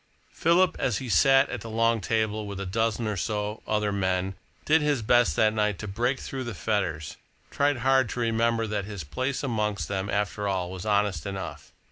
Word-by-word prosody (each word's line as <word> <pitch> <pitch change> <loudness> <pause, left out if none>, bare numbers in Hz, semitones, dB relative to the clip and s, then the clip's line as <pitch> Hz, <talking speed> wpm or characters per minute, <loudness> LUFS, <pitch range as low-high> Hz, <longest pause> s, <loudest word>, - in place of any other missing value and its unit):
Philip, 170 +2 +3
as 120 -6 +1
he 130 -2 -5
sat 135 +3 +5
at - - -4
the 115 - -7
long 115 0 +2
table 110 0 -1
with 100 -1 -6
a 100 - -3
dozen 110 +3 0
or 105 -1 -1
so 105 +3 -2
other 105 -1 +1
men, 95 -1 0 0.3
did 160 +1 +4
his 145 -5 +1
best 120 -8 +4
that 110 -1 +3
night 105 -2 0
to 110 - -6
break 120 +7 -1
through 135 -1 -5
the 115 -3 -5
fetters, 85 -8 -2 0.3
tried 145 -1 +1
hard 130 0 +3
to - - -4
remember 115 0 +1
that 105 -2 -2
his 100 -5 -6
place 130 - -3
amongst 105 -5 -1
them, 95 0 -2
after 105 0 -1
all, 90 -2 -1
was 95 +2 -6
honest 100 -6 +1
enough. 95 -1 -6
110 Hz, 195 wpm, -27 LUFS, 100-120 Hz, 0.3 s, sat